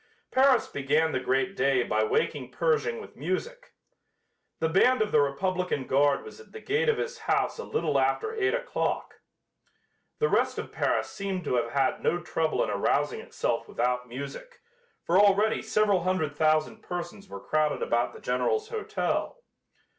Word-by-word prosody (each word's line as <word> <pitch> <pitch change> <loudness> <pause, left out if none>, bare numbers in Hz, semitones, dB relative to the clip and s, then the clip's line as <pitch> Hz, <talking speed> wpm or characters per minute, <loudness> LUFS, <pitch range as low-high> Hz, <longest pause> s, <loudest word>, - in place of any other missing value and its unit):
Paris 260 -1 +4
began 150 +3 +1
the 130 - 0
great 135 +10 0
day 135 -1 +2
by - - +1
waking 445 +1 -1
Pershing 470 -1 0
with 450 - -11
music. - - -4 0.8
The 160 - +1
band 245 +10 +4
of 210 - -5
the 150 - +5
republican 180 +1 -1
guard 140 +2 +2
was 440 - -11
at 450 - -16
the 445 - -7
gate 450 +3 0
of 450 - +2
his 475 -1 -4
house - - +1
a - - -4
little 450 - 0
after 440 0 0
eight 430 +1 +1
o'clock. - - -3 1.0
The 455 - +2
rest - - +1
of - - -5
Paris - - 0
seemed 195 -2 -4
to 145 - -2
have 120 -1 +1
had 135 -2 +1
no 175 - +1
trouble 160 -2 -1
in - - -2
arousing - - 0
itself - - -2
without 125 0 -1
music, 140 - -8 0.4
for 175 +3 +3
already 205 +2 +4
several 205 -3 +2
hundred 170 -5 -1
thousand 155 0 +1
persons 175 +3 -6
were - - -7
crowded 155 -1 0
about 120 +1 +1
the - - -13
General's 425 - 0
hotel. 465 +2 -2
185 Hz, 165 wpm, -27 LUFS, -, 1.0 s, the